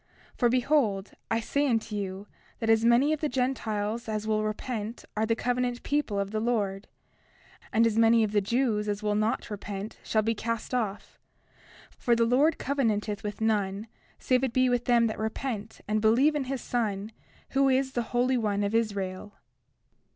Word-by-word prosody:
30:2 - - -26
For 240 - +4
behold, 240 -6 +1 0.2
I 225 - +1
say 285 +5 0
unto 225 -3 0
you 195 -1 -4 0.3
that 225 -1 +1
as 225 0 +4
many 240 +6 +4
of 310 - -3
the 305 - 0
Gentiles 230 -4 -2
as 215 0 -2
will 215 -1 +1
repent 215 +1 -4
are 220 +1 0
the 230 - +2
covenant 245 +1 -1
people 285 -9 0
of 200 0 -2
the 215 - -1
Lord; 210 -4 -1 0.8
and 225 +1 +4
as 225 -1 +2
many 230 0 +5
of 210 - -1
the 210 -1 +2
Jews 215 -1 0
as 205 +1 -3
will 210 -1 +1
not 215 +2 -1
repent 205 0 -6
shall 215 -1 +1
be 225 +1 +1
cast 230 +2 -4
off; 215 -5 -3 0.8
for 240 - +3
the 230 0 +3
Lord 280 +7 +3
covenanteth 215 -7 -1
with 210 +1 -5
none 205 -2 0 0.3
save 255 0 +1
it 260 -3 0
be 255 0 +3
with 245 -1 0
them 240 -1 +4
that 220 - -2
repent 220 -1 -4
and 215 +1 +1
believe 240 +8 +4
in 290 -3 -1
his 265 -1 -3
Son, 215 -3 -2 0.4
who 275 0 +3
is 265 0 +2
the 240 - -1
Holy 250 +1 +2
One 205 -3 0
of 200 +1 -1
Israel. 200 -3 -2
225 Hz, 185 wpm, -28 LUFS, 210-250 Hz, 0.8 s, many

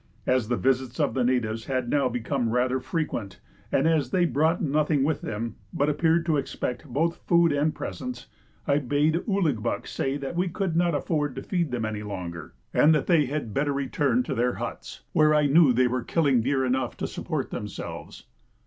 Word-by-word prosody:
As 130 -3 +2
the 120 +1 0
visits 130 +1 0
of 145 - +1
the 130 - +1
natives 115 -3 0
had 130 -2 -1
now 140 0 +2
become 125 0 -1
rather 125 +2 +1
frequent, 130 - -3 0.3
and - - +2
as 155 -6 +2
they 180 +4 +2
brought 160 +2 +2
nothing 150 -1 +1
with 155 +2 0
them, 110 +1 -4
but 145 +1 +1
appeared 165 +3 +2
to 160 -3 +2
expect 135 0 -4
both 160 +6 0
food 170 -2 +4
and 145 +2 +1
presents, 125 -1 -6 0.4
I 140 0 +2
bade 145 +4 +1
Ouligbuck 165 - 0
say 135 +1 -2
that 140 +3 -5
we 180 +2 +1
could 180 -1 -2
not 170 -1 +2
afford 145 -2 -1
to - - -6
feed 175 -5 -1
them 120 -3 -2
any 110 -1 -3
longer, 90 -6 -6 0.2
and 155 +1 +5
that 150 - 0
they 160 -6 +3
had 135 -6 -3
better 145 +1 0
return 140 - +1
to - - -3
their 125 +1 +1
huts, - - -6
where 155 0 +4
I 150 -1 +3
knew 145 0 +6
they 125 +1 +3
were 125 0 -1
killing 140 -4 +2
deer 130 +2 +1
enough 130 -1 -1
to - - -3
support - - -4
themselves. - - -7
140 Hz, 195 wpm, -26 LUFS, 125-155 Hz, 0.4 s, knew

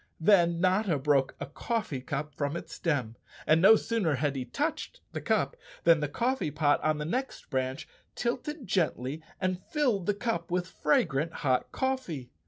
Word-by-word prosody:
Then 170 -1 +4
Notta 185 -1 +2
broke 135 -1 +2
a - - -3
coffee 155 - -3
cup 145 +3 -4
from 145 +3 -2
its - - -9
stem, 130 -9 -1 0.3
and 160 +1 +4
no 205 +4 +9
sooner 210 -9 0
had 145 +1 0
he 130 -2 -3
touched 310 - -3
the - - -4
cup - - +1 0.3
than 165 -1 +6
the 150 - -1
coffee 245 - 0
pot 145 0 +2
on 155 0 +2
the 150 - -3
next 255 - -3
branch 130 +2 -2 0.3
tilted 255 +4 -3
gently 160 - -1 0.2
and 185 -1 -1
filled 245 - 0
the 205 - +2
cup 205 -6 -2
with 180 0 0
fragrant 165 - +1
hot 130 -2 +1
coffee. 255 - -2
170 Hz, 170 wpm, -29 LUFS, 145-220 Hz, 0.3 s, no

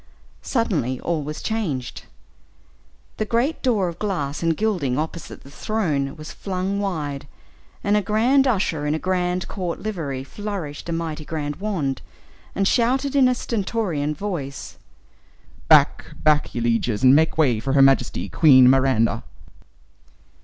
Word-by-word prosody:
Suddenly 160 - -1
all 165 -3 -1
was 150 +1 -6
changed. 165 - -3 1.1
The - - 0
great 235 +8 0
door 220 -8 +1
of 170 0 -6
glass 160 -8 -2
and 165 -2 +1
gilding 175 -13 0
opposite 160 +1 -5
the 140 - -14
throne 150 -9 -2
was 155 -1 -9
flung 195 +1 -3
wide, 150 -9 -3 0.6
and 205 +1 +2
a 210 - +3
grand 245 +7 +3
usher 185 - 0
in 150 - +1
a - - 0
grand 180 0 -1
court 180 -3 -4
livery 155 -11 -4
flourished 175 -3 -6
a - - -1
mighty 165 -2 -3
grand 150 -2 -4
wand, 180 -10 -2 0.5
and 195 0 +1
shouted, 260 +5 +1
in 270 -2 +5
a 250 - +2
stentorian 190 -11 -2
voice, 150 -7 -5 0.9
"Back: - - +5 0.2
back, 150 -1 +2
ye 120 - -1
lieges, 115 -1 0
and 130 +1 +7
make 160 +1 +2
way 130 -8 +3
for 135 +4 -2
Her 140 - +5
Majesty, 125 -8 +2
Queen 130 - +6
Miranda!" 130 -4 +2
165 Hz, 145 wpm, -22 LUFS, 140-205 Hz, 1.1 s, and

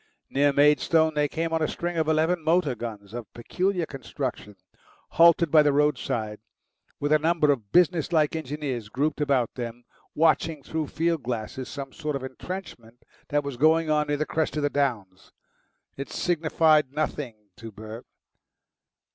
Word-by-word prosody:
Near 145 +1 +3
Maidstone 150 +3 +3
they 150 -1 +1
came 165 +2 -3
on 160 - +1
a 155 - +2
string 175 0 -4
of 160 -2 0
eleven 160 +2 +1
motor 160 -3 +2
guns 110 -4 -8
of 120 -4 -7
peculiar 180 +8 -1
construction 130 -6 -6 0.5
halted 170 -1 +5
by 155 - +7
the 150 -1 +3
roadside, 120 -7 0 0.6
with 145 +1 -1
a 155 - +5
number 160 -1 +2
of 110 -7 -3
businesslike 165 -3 +3
engineers 140 -7 -4
grouped 145 +6 -1
about 135 -5 +1
them 120 -1 -6 0.3
watching 160 -1 +2
through 160 +1 -3
field 165 0 -1
glasses 120 +1 -5
some 140 -1 -7
sort 150 -2 -4
of 135 - -4
entrenchment 130 -5 -8 0.2
that 145 0 0
was 140 -3 -5
going 160 +3 +3
on 150 0 +2
near 145 0 0
the 155 - -1
crest 155 0 -1
of 150 - -1
the 145 - +1
downs. 110 -10 -2 0.6
It 140 - -6
signified 155 -4 +2
nothing 125 -8 -4
to 115 -1 -9
Bert. 110 +3 -10
145 Hz, 155 wpm, -26 LUFS, 125-160 Hz, 0.6 s, by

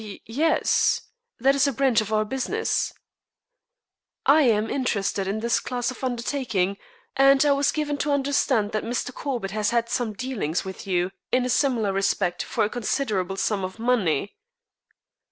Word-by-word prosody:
"Y 205 -2 -9
yes. 305 +8 +1 0.3
That 270 +3 +4
is 280 0 +3
a - - +1
branch 260 -3 +2
of 215 0 -6
our 215 0 +2
business." 265 - -1 1.3
"I 295 +3 +6
am 220 -5 +3
interested 200 -7 -1
in 210 +3 -2
this 235 0 +2
class 245 -1 -2
of 255 - -11
undertaking, 235 -6 -1 0.4
and 275 +1 +5
I 290 - +4
was 280 0 +2
given 295 -2 -2
to 295 - 0
understand 270 -6 +1
that 215 -1 -2
Mr. 245 +2 -3
Corbett 245 -10 -4
has 210 0 0
had 235 -1 0
some 240 -3 -1
dealings 200 - -3
with 190 +1 -8
you 180 -1 0 0.2
in 250 0 +2
a - - -2
similar 240 -7 +1
respect 195 -2 0
for 220 - -1
a - - +2
considerable 210 -6 -1
sum 200 -1 0
of 185 +2 -5
money." 215 - 0
235 Hz, 165 wpm, -24 LUFS, 205-270 Hz, 1.3 s, I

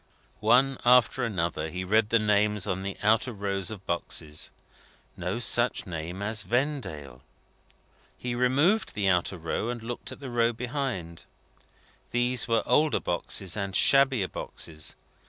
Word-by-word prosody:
One 130 +5 +3
after 125 +1 +4
another, 85 -7 -2
he 90 +3 -4
read 105 +3 +2
the 115 - +4
names 105 -1 +1
on 95 -2 -2
the 100 0 -5
outer 110 +4 +3
rows 100 -3 -2
of 100 -4 -8
boxes. 80 -3 -2 0.7
No 90 +4 -3
such 120 +1 +3
name 90 +2 -5
as 110 0 0
Vendale! 110 - -3 1.0
He 125 -1 -4
removed 140 - +2
the 100 -2 0
outer 90 0 +1
row, 85 +7 -3
and 120 -2 -5
looked 120 +1 -5
at - - -10
the 135 -3 -7
row 120 0 +2
behind. 120 - -4 0.8
These 120 0 +1
were 115 -1 +2
older 150 +5 +3
boxes, 90 +1 -2
and 100 -2 -3
shabbier 135 -7 +5
boxes. 80 -4 -5
105 Hz, 140 wpm, -27 LUFS, 90-120 Hz, 1.0 s, shabbier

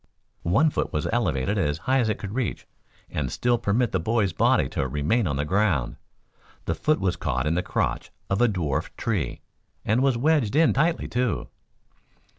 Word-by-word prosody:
One 150 - +4
foot - - -2
was 75 - -1
elevated 100 - 0
as 75 -5 0
high 135 +1 +3
as 115 -3 +1
it 110 - 0
could 105 0 -6
reach 125 -5 -2 0.5
and 65 -5 -2
still 120 -1 +1
permit 115 +2 +1
the 95 - 0
boy's 105 0 0
body - - +3
to 65 - -2
remain 75 - 0
on 70 - -1
the 70 +2 -1
ground. 90 - +1 0.7
The - - 0
foot 155 0 +1
was 95 -2 0
caught 65 0 -2
in 75 - +1
the 90 - +1
crotch - - -2 0.2
of 95 +3 0
a 120 - +6
dwarfed 85 -10 -2
tree, 95 - -2 0.4
and 110 +5 +2
was 135 -3 +2
wedged 140 -4 +2
in 160 +1 +5
tightly, 165 +5 +1
too. 120 - -1
105 Hz, 185 wpm, -25 LUFS, 75-120 Hz, 0.7 s, a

